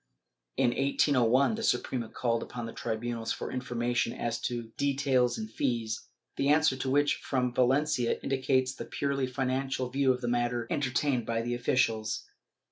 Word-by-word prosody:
In 120 - +3
1801, 135 - +3
the 225 - -3
Suprema 125 - 0
called 115 -1 -1
upon 120 -1 -6
the 115 - -7
tribunals 115 0 -3
for - - -4
information 120 -2 -1
as 115 -1 -3
to 120 -2 -3
details 135 -3 +2
and 220 -1 -4
fees, 115 - -2 0.3
the 140 - +1
answer 150 -2 +4
to 130 0 -3
which 145 +2 +3
from 125 -3 -1
Valencia 130 0 +2
indicates 130 -1 +1
the - - -7
purely 140 -2 -1
financial 130 0 -1
view 135 0 +3
of 125 0 -2
the 120 - -2
matter 120 -1 0
entertained 135 -3 0
by 115 0 0
the 120 +1 -2
officials. 115 -3 0
125 Hz, 155 wpm, -30 LUFS, 120-135 Hz, 0.3 s, answer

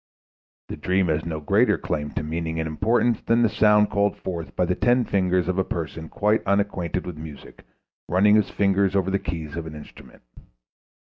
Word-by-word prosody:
The - - -6
dream 95 -1 +1
has 80 +1 0
no 80 -2 -3
greater 75 - +2
claim 75 -1 -3
to - - -3
meaning 80 +1 -3
and 80 - -1
importance 115 +8 +1
than 115 +1 +2
the 115 - +4
sound 105 0 +3
called 100 0 +1
forth 85 -3 -6
by 90 - +1
the 90 - 0
ten 120 +4 +2
fingers 90 -2 +1
of 95 0 0
a - - +3
person 80 -2 -5
quite 105 +2 +1
unacquainted 95 -3 -1
with 85 -4 -7
music 80 -2 -11 0.5
running 95 +5 +4
his 105 -2 +3
fingers 100 -1 +1
over 95 -1 +1
the 100 - +1
keys 80 -4 -5
of 85 -1 -5
an 75 - -8
instrument. 75 - -14
90 Hz, 190 wpm, -24 LUFS, 80-100 Hz, 0.5 s, the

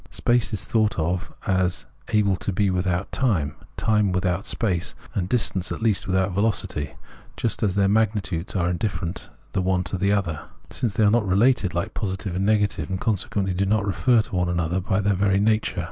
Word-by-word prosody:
Space 120 0 +1
is 100 -4 -2
thought 110 -2 +1
of 90 +3 -1
as 95 -2 +1 0.2
able 105 -3 +3
to 100 - -2
be 100 +1 +1
without 90 0 -1
time, 90 - 0 0.2
time 105 -3 +2
without 90 +1 0
space, 90 -7 0 0.2
and 90 -2 -2
distance 100 -6 0
at - - -4
least 105 -4 +1
without 95 +1 +1
velocity 95 -7 -1 0.2
— - - -24
just 115 - 0
as 100 -4 +1
their 100 -1 +3
magnitudes 100 -4 0
are 90 -2 +1
indifferent 85 -1 -3 0.2
the 95 - +1
one 90 0 +1
to 90 +2 -3
the 100 +2 +2
other, 95 -7 0 0.3
since 115 -5 -1
they 110 - +3
are 105 - +5
not 115 -3 +2
related 100 -1 +3
like 85 - -2
positive 95 -3 -3
and 95 +2 0
negative, 105 -8 +1
and 95 - -2
consequently 100 -2 -1
do 95 +2 0
not 105 0 +2
refer 115 +3 +3
to 100 - -7
one 90 -1 +1
another 85 +1 0
by 95 +1 0
their 100 0 +2
very 95 0 +2
nature. 110 +1 +1
95 Hz, 195 wpm, -24 LUFS, 90-105 Hz, 0.3 s, are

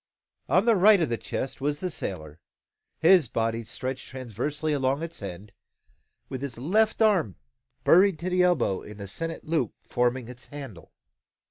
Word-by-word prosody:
On 185 - +4
the 230 -2 +5
right 205 +2 +6
of 165 - +1
the 115 - -1
chest 135 - -4
was 145 +1 -1
the 180 +1 -3
sailor, 80 - -5 0.6
his 170 -4 +5
body 115 +1 -1
stretched 130 +4 -5
transversely 130 +5 -3
along 135 +2 0
its 165 -5 -5
end, 100 +1 -7 0.8
with 130 -1 -6
his 140 -4 -5
left 215 - +2
arm 185 - +2 0.5
buried 190 0 +5
to 175 +4 -3
the 180 0 +3
elbow 155 - +2
in 105 -1 -11
the 100 -1 -7
sennit 165 +11 -4
loop 155 -8 -1
forming 125 0 0
its 125 +1 -9
handle. 135 -12 -9
135 Hz, 160 wpm, -26 LUFS, 115-170 Hz, 0.8 s, right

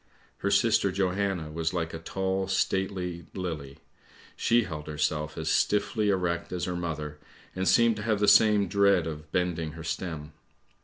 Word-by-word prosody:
Her - - 0
sister 100 - +3
Johanna 95 -3 -1
was 80 +2 -2
like 85 -1 -2
a 80 - -5
tall, 95 +2 -2
stately 95 -3 -1
lily; 75 -7 -5 0.6
she 120 0 +3
held 75 -6 -7
herself 75 +1 -2
as 80 -1 -4
stiffly 105 +1 +1
erect 90 -3 -1
as 90 -1 -2
her 90 - -3
mother, 75 -4 -4 0.4
and 95 0 -1
seemed 115 -2 +4
to - - -5
have 110 -1 0
the 105 - +2
same 105 -1 +6
dread 100 -2 +3
of 75 -1 -7
bending 85 -3 -1
her 80 0 -8
stem. 80 -3 -4
90 Hz, 160 wpm, -28 LUFS, 80-100 Hz, 0.6 s, same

